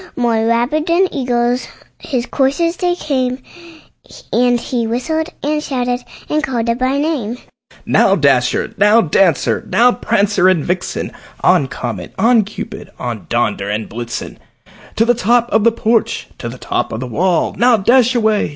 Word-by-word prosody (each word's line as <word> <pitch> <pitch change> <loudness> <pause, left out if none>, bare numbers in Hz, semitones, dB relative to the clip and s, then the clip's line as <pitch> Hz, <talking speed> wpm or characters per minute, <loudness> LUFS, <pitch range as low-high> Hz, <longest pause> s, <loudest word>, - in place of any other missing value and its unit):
More 230 -2 +1
rapid 245 +8 +1
than 350 +3 +3
eagles 245 -2 0 0.3
his 250 -6 -3
coursers 285 +7 0
they 355 -1 0
came, 255 -6 -1 1.0
And 245 0 +3
he 235 -1 -2
whistled, 315 +8 -2
and 300 +1 0
shouted, 245 -3 -2 0.2
and 305 +1 0
called 245 -5 -1
them 235 +1 -1
by 260 +2 +1
name: 280 -7 -2 0.5
"Now, - - +3
Dasher! - - +1
now, 210 +3 +5
Dancer! 170 -2 +1
now, 245 +2 +4
Prancer 200 -5 +2
and 175 -5 +1
Vixen! 180 +1 -3 0.3
On, - - +3
Comet! - - -6
on, 230 0 +4
Cupid! 210 - -8
on, 120 -4 -5
Donder 105 -4 -1
and 105 +1 -3
Blitzen! 120 +1 -6 0.6
To 225 - +3
the 240 - +4
top 240 +1 +2
of 220 - +3
the 230 - +5
porch! 225 0 0
to 120 - -5
the 125 - -9
top - - -2
of 110 - -4
the 130 - -4
wall! 170 +8 0
Now 240 +2 +4
dash 245 +4 +3
away! 220 -3 +1
235 Hz, 160 wpm, -16 LUFS, 205-260 Hz, 1.0 s, now